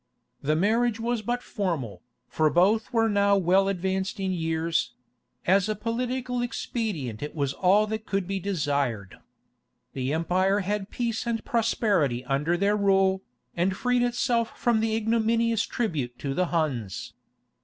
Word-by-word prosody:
The 150 +2 +1
marriage 225 +6 +2
was 235 0 -1
but 240 +3 -2
formal, 165 - -3 0.3
for 155 -1 +2
both 200 +8 +2
were 225 -2 +3
now 200 -1 +3
well 190 +1 +3
advanced 190 +1 -2
in 190 -1 -1
years: 165 -1 -1 0.5
as 195 +3 +3
a 215 - 0
political 245 +3 -2
expedient 205 - -3
it 150 - -5
was 140 -3 -1
all 195 +6 +3
that 220 0 -5
could 195 -2 -1
be 195 0 -2
desired. 140 - -2 0.7
The 130 0 -2
empire 185 +5 +1
had 200 +1 -2
peace 235 -1 -2
and 230 -1 -2
prosperity 200 - +1
under 150 +6 0
their 200 +3 +2
rule, 195 -2 +3 0.3
and 185 +2 0
freed 250 -1 +1
itself 240 -1 0
from 235 -2 +2
the 220 0 0
ignominious 230 0 +1
tribute 145 - -2
to 135 +1 -3
the 180 +4 +1
Huns. 135 - -2
195 Hz, 145 wpm, -26 LUFS, 160-225 Hz, 0.7 s, were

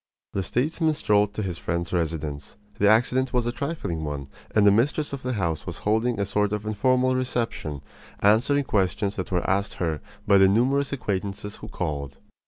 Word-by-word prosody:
The 100 - 0
statesman 155 - 0
strolled 105 -5 +2
to 110 - -2
his 90 -3 -4
friend's 85 +1 -2
residence. 80 -3 -3 0.2
The 100 - +5
accident 125 +4 +3
was 125 -2 +1
a 120 - 0
trifling 130 - -3
one, 70 -2 -4 0.3
and 105 -2 +5
the 100 - +8
mistress 140 +8 +1
of 140 - -4
the 125 0 -2
house 85 -7 -2
was - - -6
holding 110 +2 +1
a 100 - +1
sort 105 +1 0
of 105 0 -3
informal 130 +4 +2
reception, 115 - -2 0.4
answering 120 +8 +4
questions 100 -2 0
that 95 - -4
were 90 -2 0
asked 100 +1 0
her 80 -4 -2 0.2
by 100 -1 +5
the 95 0 +6
numerous 130 +7 +2
acquaintances 105 -4 -3
who 110 - -9
called. 70 -9 -4
105 Hz, 185 wpm, -25 LUFS, 90-125 Hz, 0.4 s, the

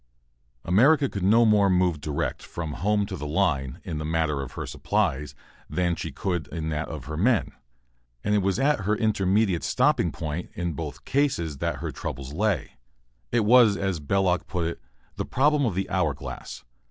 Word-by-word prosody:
America 140 - +5
could 100 - -5
no 110 +5 +5
more 105 -2 +4
move 90 -4 +2
direct 75 -1 -2
from 80 -3 -5
home 105 +3 +1
to - - -5
the 75 - -5
line 75 -6 0
in 75 - -4
the - - -3
matter 80 -2 0
of 70 - -7
her - - -5
supplies 75 +2 -1 0.3
than 90 -1 0
she - - -5
could 90 -6 -2
in 80 -1 -4
that 75 +1 -2
of 75 -5 -7
her 75 - -5
men. 110 +7 +2 0.7
And 105 - +1
it 105 - +4
was 95 -1 0
at 140 0 +2
her 105 +1 0
intermediate 100 -3 +1
stopping - - +2
point, 80 +2 -5
in 85 -2 -2
both 75 -2 -6
cases, 85 - 0
that 85 -1 -1
her - - -3
troubles 70 +1 -6
lay. 105 - -1 0.5
It 115 -3 +2
was, 115 -3 +6
as 95 -4 -1
Belloc 90 +4 +1
put 90 -3 -2
it, 85 - -4 0.4
the - - -1
problem 145 0 +2
of 100 - -2
the 95 0 -1
hour - - 0
glass. - - -8
90 Hz, 185 wpm, -26 LUFS, 80-105 Hz, 0.7 s, was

